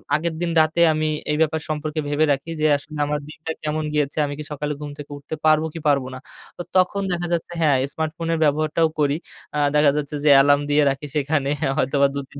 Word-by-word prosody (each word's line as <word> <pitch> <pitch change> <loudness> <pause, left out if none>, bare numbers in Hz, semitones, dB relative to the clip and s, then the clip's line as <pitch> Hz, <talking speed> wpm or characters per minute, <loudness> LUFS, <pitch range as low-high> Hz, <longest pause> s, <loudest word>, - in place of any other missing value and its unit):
আগের 165 +1 -1
দিন 170 -1 -1
রাতে 160 +2 +1
আমি 155 0 0 0.2
এই 150 - 0
ব্যাপার 160 0 +1
সম্পর্কে 155 0 -3
ভেবে 150 +2 +2
রাখি 140 +5 -5
যে 155 - +4
আসলে 150 +1 -10
আমার 150 0 -1
দিনটা 160 +1 -6
কেমন 155 +1 -1
গিয়েছে, 145 0 -1
আমি 145 - -4
কি - - -4
সকালে 150 +1 -3
ঘুম 145 -1 -6
থেকে 145 0 -10
উঠতে 145 +2 -7
পারবো 155 0 +4
কি 165 - -6
পারব 140 -2 +3
না? - - -8 0.4
তো - - -5 0.2
তখন 185 +2 +2
দেখা 175 0 -2
যাচ্ছে 170 +1 -3
হ্যাঁ, 145 -4 +4 0.2
স্মার্টফোনের 160 +1 -2
ব্যবহারটাও 155 +2 +2
করি। 145 0 +2 0.4
আ - - -1 0.2
দেখা 150 -1 +5
যাচ্ছে 150 0 -3
যে - - +5
অ্যালার্ম 145 +1 +5
দিয়ে 145 0 +4
রাখি 135 +2 -3
সেখানে 145 -1 0 0.3
হয়তোবা 140 0 +2
২ - - -1
৩ 140 - -11
150 Hz, 215 wpm, -22 LUFS, 145-160 Hz, 0.4 s, দেখা